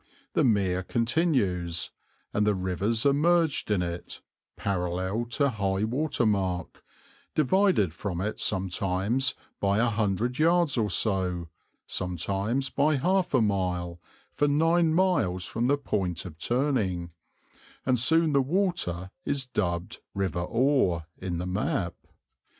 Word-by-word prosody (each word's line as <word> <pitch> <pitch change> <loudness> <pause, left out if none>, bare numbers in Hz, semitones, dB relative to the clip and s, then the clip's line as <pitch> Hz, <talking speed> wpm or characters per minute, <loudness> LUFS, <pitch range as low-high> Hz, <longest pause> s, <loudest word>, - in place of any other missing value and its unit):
The - - +3
mere 95 -6 +2
continues, 110 - 0 0.4
and 105 0 +1
the 105 - +3
rivers 95 +6 -1
are 140 - +5
merged 165 -1 +2
in 100 -4 +2
it, 85 0 -6 0.4
parallel 95 +3 -1
to 140 -2 +3
high 100 -2 -1
water 130 +3 0
mark, 95 -4 -1 0.5
divided 155 - +3
from 90 0 -4
it 105 +4 -3
sometimes 95 +6 0 0.2
by 100 0 +1
a 115 - +3
hundred 115 +2 0
yards 170 -2 +3
or 110 -4 +1
so, 90 -6 +1 0.4
sometimes 100 - -2
by 150 +2 +2
half 180 +3 +1
a 125 - +4
mile, 90 -4 -1 0.3
for 145 - +2
nine 165 +3 +3
miles 160 - +1
from 120 +2 -1
the 145 +2 +3
point 95 - -2
of 80 -3 -9
turning, 105 - 0 0.7
and 130 -2 +2
soon 160 +4 +3
the 140 - +4
water 135 - 0
is 140 -2 -1
dubbed 85 -8 -2 0.2
River 95 -4 -1
Ore 115 - +1
in 90 -2 -3
the 90 - -3
map. 90 -1 -1
105 Hz, 130 wpm, -27 LUFS, 90-140 Hz, 0.7 s, are